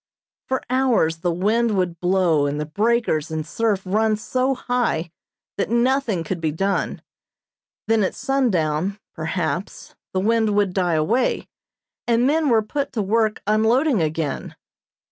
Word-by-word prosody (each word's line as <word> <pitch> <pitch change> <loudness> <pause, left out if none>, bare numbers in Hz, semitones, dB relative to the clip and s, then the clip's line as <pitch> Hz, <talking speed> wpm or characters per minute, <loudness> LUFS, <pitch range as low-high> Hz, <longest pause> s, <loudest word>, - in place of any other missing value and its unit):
For 260 - -1
hours 250 -11 +2
the 175 +1 -1
wind 210 +5 +1
would 175 -3 -1
blow 175 -5 +2
and 145 +1 -2
the 150 - -2
breakers 205 -2 0
and 155 -1 -3
surf 205 +2 -1
run 215 +3 +1
so 255 +5 0
high 245 -11 -1 0.5
that 200 - -1
nothing 235 -5 +1
could 170 +1 -4
be 160 -2 0
done; 195 +5 -1 0.8
then 225 -1 +3
at 185 - -1
sundown, 195 - 0 0.2
perhaps, 160 +2 -3 0.2
the 185 - 0
wind 220 +1 +2
would 200 -3 +2
die 180 -3 +1
away, 170 +12 +1 0.6
and 235 +1 +3
men 305 +2 +2
were 225 -3 +3
put 280 +6 -3
to 215 - -1
work 215 +2 0
unloading 220 - +2
again. 155 -2 -2
205 Hz, 145 wpm, -22 LUFS, 165-235 Hz, 0.8 s, then